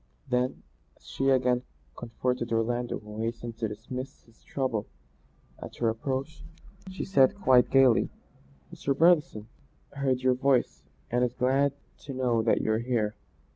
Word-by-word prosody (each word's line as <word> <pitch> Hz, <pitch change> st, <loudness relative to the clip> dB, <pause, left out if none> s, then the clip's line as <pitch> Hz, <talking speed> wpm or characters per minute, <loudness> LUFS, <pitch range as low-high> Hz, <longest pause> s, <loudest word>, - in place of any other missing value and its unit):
Then, 125 Hz, 0 st, -1 dB, 0.3 s
as -, -, -27 dB
she 135 Hz, 0 st, -1 dB
again 125 Hz, -2 st, +3 dB, 0.3 s
confronted 120 Hz, +1 st, -3 dB
Orlando 120 Hz, +2 st, 0 dB
who 105 Hz, 0 st, -10 dB
hastened 115 Hz, 0 st, -4 dB
to 110 Hz, -, 0 dB
dismiss 125 Hz, +6 st, -7 dB
his 115 Hz, -1 st, -25 dB
trouble 130 Hz, -6 st, -2 dB, 0.7 s
at -, -, -8 dB
her 115 Hz, -, +1 dB
approach, 135 Hz, +6 st, -4 dB, 0.5 s
she 190 Hz, -, -5 dB
said 135 Hz, -9 st, +4 dB
quite 130 Hz, -11 st, +4 dB
gaily, 130 Hz, -4 st, +4 dB, 0.6 s
"Mr. 140 Hz, -5 st, -1 dB
Brotherson 155 Hz, -9 st, +3 dB, 0.5 s
heard 135 Hz, -2 st, 0 dB
your 130 Hz, 0 st, +4 dB
voice, 130 Hz, 0 st, +1 dB, 0.3 s
and 120 Hz, +1 st, +2 dB
is 125 Hz, 0 st, -1 dB
glad 135 Hz, +3 st, +2 dB, 0.3 s
to 135 Hz, -, -8 dB
know 125 Hz, -3 st, +1 dB
that 110 Hz, -, +2 dB
you're 110 Hz, 0 st, +1 dB
here. 115 Hz, -3 st, -1 dB
125 Hz, 140 wpm, -28 LUFS, 115-135 Hz, 0.7 s, said